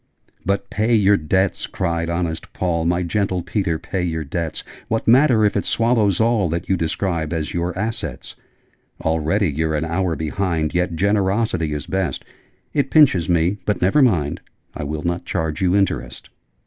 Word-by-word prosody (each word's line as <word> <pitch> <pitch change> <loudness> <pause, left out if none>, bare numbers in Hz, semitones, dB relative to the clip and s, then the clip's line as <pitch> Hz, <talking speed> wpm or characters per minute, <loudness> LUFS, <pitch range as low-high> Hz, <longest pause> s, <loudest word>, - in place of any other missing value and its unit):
'But 100 +1 -1
pay 110 +3 +2
your 105 -1 +5
debts!' 95 +2 0
cried 85 -2 -2
honest 85 -1 -3
Paul. 85 -3 -1
'My 90 +1 +1
gentle 95 -1 -1
Peter, 85 -1 -1
pay 90 +2 -4
your 80 -2 -2
debts! 80 +2 -4 0.2
What 110 0 -2
matter 120 -2 +5
if 105 - +1
it 100 - +1
swallows 115 -5 +2
all 110 -5 +2
That 85 +2 -3
you 95 - +2
describe 85 -1 -2
as 80 -2 -3
your 85 +1 -2
"assets"? 110 - -4 0.7
Already 80 +4 +1
you're 80 +2 -1
an 75 +2 -1
hour 85 +1 -1
behind: 80 -1 -1
Yet 90 -1 0
Generosity 100 -2 +1
is 75 -1 -4
best. 95 -8 -2 0.5
It 140 -2 +1
pinches 115 - +4
me 90 +4 +2
but 105 0 -1
never 95 +11 +3
mind! 85 - +2 0.3
I - - -4
WILL 75 +1 -4
NOT 85 0 -2
CHARGE 80 0 -2
YOU 95 0 +2
INTEREST!' 65 -11 -1
90 Hz, 165 wpm, -21 LUFS, 80-100 Hz, 0.7 s, your